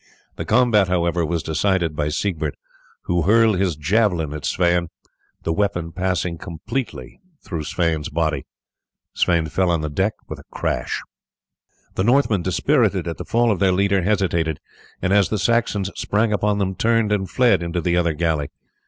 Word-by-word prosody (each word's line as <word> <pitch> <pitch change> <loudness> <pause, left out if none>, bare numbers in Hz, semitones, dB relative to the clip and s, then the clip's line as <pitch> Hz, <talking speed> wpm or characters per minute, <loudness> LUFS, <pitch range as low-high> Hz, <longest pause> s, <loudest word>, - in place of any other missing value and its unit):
The - - -5
combat, 110 -4 +3
however, 85 -1 +1
was 80 0 -1
decided 85 0 0
by 75 0 -1
Siegbert, 80 -3 -2 0.5
who 85 0 0
hurled 110 +2 +4
his 95 -5 +1
javelin 85 -1 +1
at 75 -2 -6
Sweyn, 85 -1 +1 0.6
the 80 - 0
weapon 90 -3 -1
passing 90 -2 -2
completely 110 +10 -5 0.2
through 85 -4 -4
his 80 -3 -1
body. 80 -4 -1 0.7
Sweyn 85 -3 +2
fell 95 +4 0
on 85 -2 +1
the 75 -1 -3
deck 95 +7 0
with - - -7
a - - -13
crash. - - -2 0.9
The 95 - -1
Northmen, 120 -4 +3
dispirited 95 - +1
at 85 - -4
the - - -6
fall 120 0 +2
of 100 - -1
their 95 -2 +3
leader, 100 +1 +2
hesitated, 85 -5 0 0.4
and 90 - +2
as 100 -2 +4
the 110 - 0
Saxons 105 -2 +1
sprang 105 +1 0
upon 105 0 +1
them 95 -2 -1
turned 115 +1 +1
and 95 -3 0
fled 125 -7 +3
into 85 +1 -2
the 85 +1 0
other 85 -2 +2
galley. 80 -2 -1
90 Hz, 165 wpm, -21 LUFS, 85-105 Hz, 0.9 s, hurled